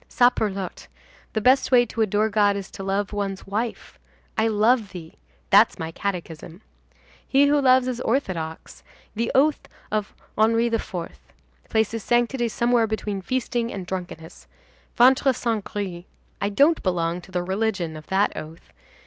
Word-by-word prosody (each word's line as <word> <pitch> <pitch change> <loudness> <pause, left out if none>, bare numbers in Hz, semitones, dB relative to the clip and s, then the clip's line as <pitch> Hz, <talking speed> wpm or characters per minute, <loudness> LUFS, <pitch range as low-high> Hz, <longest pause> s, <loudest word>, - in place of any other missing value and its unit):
Saperlotte! 210 -6 0 0.5
the 220 - -1
best 260 +5 +3
way 245 -1 +6
to 225 0 -4
adore 215 0 +2
God 205 -1 +2
is 195 -1 -6
to 195 - -9
love 195 +1 -2
one's 195 -2 -3
wife. 220 +4 -4 0.4
I 220 - +2
love 220 0 +2
thee! 165 -3 -9 0.4
that's - - +6
my 160 0 -5
catechism. 175 -1 -6 0.6
He 275 +1 +4
who 290 0 +3
loves 255 -1 +4
is 250 -1 -3
orthodox. 185 - -3 0.3
The 230 +2 -1
oath 290 +3 +2 0.2
of 210 -1 -2 0.2
Henri 225 +2 +3
IV. 225 - -2 0.8
places 220 0 0
sanctity 240 +1 +1
somewhere 235 0 +1
between 210 -2 -3
feasting 240 +2 -2
and 190 -2 -6
drunkenness. 175 -3 -7 0.5
Ventre 260 +2 +5
saint 225 -3 -2
gris! 185 -4 -5 0.4
I 200 - 0
don't 285 +10 +3
belong 175 -1 -1
to 190 - -16
the 180 -1 -1
religion 190 -3 -2
of 155 0 -11
that 195 +2 +1
oath. 160 +2 -10
210 Hz, 150 wpm, -24 LUFS, 190-240 Hz, 0.8 s, way